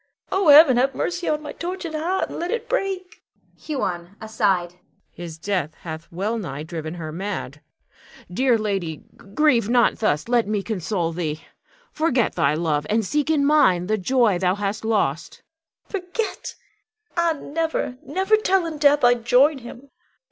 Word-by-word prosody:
Oh, 385 -2 +1
Heaven, 290 -3 +8
have 265 +1 +2
mercy 355 0 -2
on 305 0 -1
my 295 - -6
tortured 350 -1 -5
heart, 340 +5 -1
and - - -6
let 345 - -3
it 470 +2 -3
break. 385 -7 -3 0.3
Huon 185 - -4
[aside]. 195 -5 -1 0.3
His 170 -2 -9
death 175 -3 -2
hath 160 -1 -8
well 205 +7 -2
nigh 155 -7 -5
driven 160 0 -6
her 160 -3 -6
mad. 170 -5 -5 0.7
Dear 250 +3 +3
lady, 195 -8 -3 0.3
grieve 250 -8 +3
not 240 -1 +3
thus. 150 -6 0
Let 235 -3 +2
me 210 -2 -1
console 185 -5 -2
thee. 160 -2 -4 0.5
Forget 275 -7 +1
thy 140 +2 +1
love, 155 -3 -1
and 220 0 +1
seek 295 +8 -1
in 295 -3 +2
mine 190 - +4
the 215 +3 0
joy 225 -2 +2
thou 185 0 +1
hast 205 +1 -3
lost. 200 -9 -1 0.5
Bianca. 375 -3 -4
Forget! 430 +4 -4 0.6
Ah, 340 -2 +1
never, 315 -5 -3
never, 380 +8 +2
till 385 -4 +1
in 315 -2 -5
death 290 -1 +4
I 245 0 +7
join 250 +5 +3
him! 250 +3 -12
230 Hz, 160 wpm, -22 LUFS, -, 0.7 s, Heaven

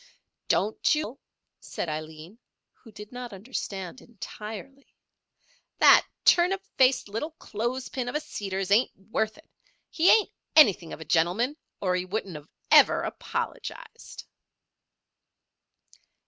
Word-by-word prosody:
"Don't 215 +8 +2
you 305 - -1
fret, 250 - -6
Til," 275 - -30 0.4
said - - -5
Aileen, 155 +6 -7 0.3
who 225 - -18
did 210 0 -11
not 245 -1 -7
understand 195 -1 -6
entirely. 225 +4 -10 0.8
"That - - +7 0.2
turnip 375 +3 +4
faced 260 -3 +3
little 225 +10 -4
clothespin 245 +3 -4
of 245 - -6
a - - +2
Seeders 195 -9 -4
ain't 225 +5 +3
worth 220 +3 -3
it. 315 - -19 0.4
He 335 +2 +3
ain't 440 -2 +5 0.2
anything 200 - +6
of - - -8
a - - -8
gentleman 180 - +1 0.3
or 185 -2 +1
he 180 0 -2
wouldn't 185 -6 -5 0.2
ever - - +6
of - - -3
apologised." - - -6
220 Hz, 125 wpm, -27 LUFS, 190-260 Hz, 0.8 s, That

